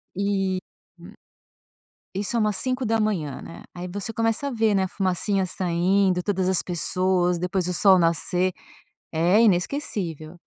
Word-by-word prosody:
E 195 Hz, -1 st, -1 dB, 0.4 s
hum. -, -, -13 dB, 1.0 s
Isso 205 Hz, +4 st, -2 dB
é -, -, +2 dB
umas 210 Hz, -2 st, +1 dB
05h, 215 Hz, -, -1 dB
né? 165 Hz, -, -11 dB
Aí, 180 Hz, 0 st, -7 dB
você 205 Hz, +4 st, -5 dB
começa 225 Hz, +5 st, -1 dB
a -, -, -3 dB
ver, 220 Hz, -3 st, +1 dB
né, 190 Hz, -, +2 dB
a 190 Hz, -, -1 dB
fumacinha 190 Hz, +1 st, 0 dB
saindo, 185 Hz, +1 st, +1 dB
todas 190 Hz, -1 st, -1 dB
as 190 Hz, -, +4 dB
pessoas, 180 Hz, 0 st, +1 dB
depois 180 Hz, 0 st, -1 dB
o 180 Hz, -, -1 dB
sol 190 Hz, +3 st, +5 dB
nascer. 175 Hz, +2 st, +1 dB, 0.6 s
É 175 Hz, +7 st, +3 dB
inesquecível. 180 Hz, -, -1 dB
190 Hz, 145 wpm, -24 LUFS, 180-210 Hz, 1.0 s, sol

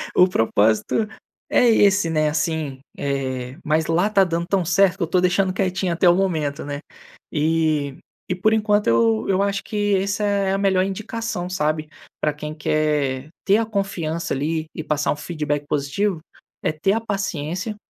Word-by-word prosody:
O 180 Hz, -, +7 dB
propósito 110 Hz, -, +1 dB, 0.4 s
é -, -, +4 dB
esse, 205 Hz, -5 st, +4 dB
né, 155 Hz, -1 st, +2 dB
assim, 150 Hz, -3 st, -2 dB, 0.2 s
eh, 130 Hz, -2 st, -3 dB
mas 155 Hz, +1 st, +1 dB
lá 175 Hz, +5 st, +2 dB
tá 200 Hz, -2 st, +4 dB
dando 170 Hz, -2 st, -1 dB
tão 195 Hz, -2 st, +1 dB
certo 190 Hz, +2 st, +3 dB
que 190 Hz, -, -1 dB
eu -, -, -1 dB
tô 180 Hz, +2 st, +2 dB
deixando 185 Hz, +1 st, +2 dB
quietinho 185 Hz, -1 st, 0 dB
até 175 Hz, +1 st, +4 dB
o 175 Hz, -, +5 dB
momento, 160 Hz, -7 st, -1 dB
né. 145 Hz, 0 st, -4 dB, 0.5 s
E 155 Hz, -3 st, 0 dB, 0.3 s
e 180 Hz, -, 0 dB
por 215 Hz, +4 st, +2 dB
enquanto 210 Hz, -1 st, +2 dB
eu 115 Hz, -1 st, +3 dB
eu 195 Hz, 0 st, +2 dB
acho 200 Hz, 0 st, -1 dB
que 205 Hz, -1 st, 0 dB
essa 200 Hz, +2 st, -1 dB
é 200 Hz, -2 st, +1 dB
a -, -, +1 dB
melhor 195 Hz, -2 st, +2 dB
indicação, 195 Hz, -1 st, -4 dB
sabe, 155 Hz, -3 st, -1 dB, 0.3 s
pra 150 Hz, -, +1 dB
quem 150 Hz, +1 st, -6 dB
quer 150 Hz, -3 st, 0 dB, 0.2 s
ter 200 Hz, +1 st, +5 dB
a 225 Hz, -, +1 dB
confiança, 180 Hz, -6 st, -2 dB
ali, 155 Hz, +4 st, -1 dB
e 160 Hz, -, -4 dB
passar 150 Hz, -1 st, 0 dB
um -, -, 0 dB
feedback 150 Hz, -2 st, -3 dB
positivo, 155 Hz, +7 st, -1 dB, 0.4 s
é -, -, +1 dB
ter 170 Hz, +6 st, 0 dB
a 225 Hz, -, 0 dB
paciência 195 Hz, -2 st, -3 dB
170 Hz, 175 wpm, -22 LUFS, 150-195 Hz, 0.5 s, O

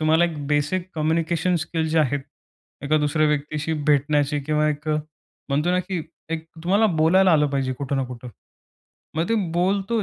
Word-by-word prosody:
तुम्हाला 160 Hz, +2 st, +4 dB
एक 150 Hz, -4 st, -4 dB
basic 150 Hz, +6 st, 0 dB
communication 165 Hz, +2 st, 0 dB
skill 160 Hz, -1 st, -2 dB
जे 160 Hz, +1 st, +1 dB
आहेत 145 Hz, -1 st, +1 dB, 0.6 s
एका 155 Hz, +2 st, +2 dB
दुसऱ्या 150 Hz, +1 st, +2 dB
व्यक्तीशी 150 Hz, +1 st, -1 dB
भेटण्याची, 145 Hz, 0 st, +2 dB
किंवा 150 Hz, +2 st, +1 dB
एक 150 Hz, +1 st, -3 dB
अ, 155 Hz, -, +2 dB, 0.5 s
म्हणतो 150 Hz, +5 st, +1 dB
ना, 180 Hz, -, +2 dB
की 180 Hz, -3 st, -4 dB, 0.3 s
एक 165 Hz, -1 st, -3 dB, 0.2 s
तुम्हाला 200 Hz, +5 st, +4 dB
बोलायला 180 Hz, +4 st, +5 dB
आलं 150 Hz, -2 st, +4 dB
पाहिजे 135 Hz, -2 st, -1 dB
कुठं 140 Hz, +2 st, -3 dB
ना 135 Hz, -, 0 dB
कुठं. 125 Hz, 0 st, -9 dB, 0.9 s
मग 165 Hz, +3 st, 0 dB
ते 230 Hz, -, +2 dB, 0.2 s
बोलतो 195 Hz, +5 st, +1 dB
155 Hz, 170 wpm, -23 LUFS, 145-170 Hz, 0.9 s, बोलायला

